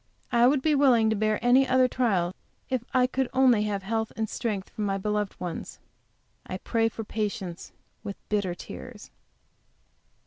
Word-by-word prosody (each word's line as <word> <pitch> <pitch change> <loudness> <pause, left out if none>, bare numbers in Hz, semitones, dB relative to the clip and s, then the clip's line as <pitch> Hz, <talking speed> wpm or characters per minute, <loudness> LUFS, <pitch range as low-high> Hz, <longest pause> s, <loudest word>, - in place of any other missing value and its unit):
I 240 0 +5
would 265 0 +2
be 310 - +3
willing 250 -6 +4
to - - +1
bear 215 0 +1
any 260 +2 +5
other 255 0 +4
trial, 195 -9 0 0.4
if 255 -3 0
I 255 -1 +4
could 260 0 -1
only 250 -5 +4
have 200 -2 -2
health 220 +2 -2
and 220 0 -1
strength 210 -4 -3
for - - -7
my 195 -1 0
beloved 210 0 -2
ones. 175 -2 -5 0.7
I - - -5
pray 225 -1 0
for 225 - -6
patience 205 -5 -4 0.3
with 200 -2 -6
bitter 200 -4 0
tears. 215 +4 -10
220 Hz, 165 wpm, -27 LUFS, 205-250 Hz, 0.7 s, I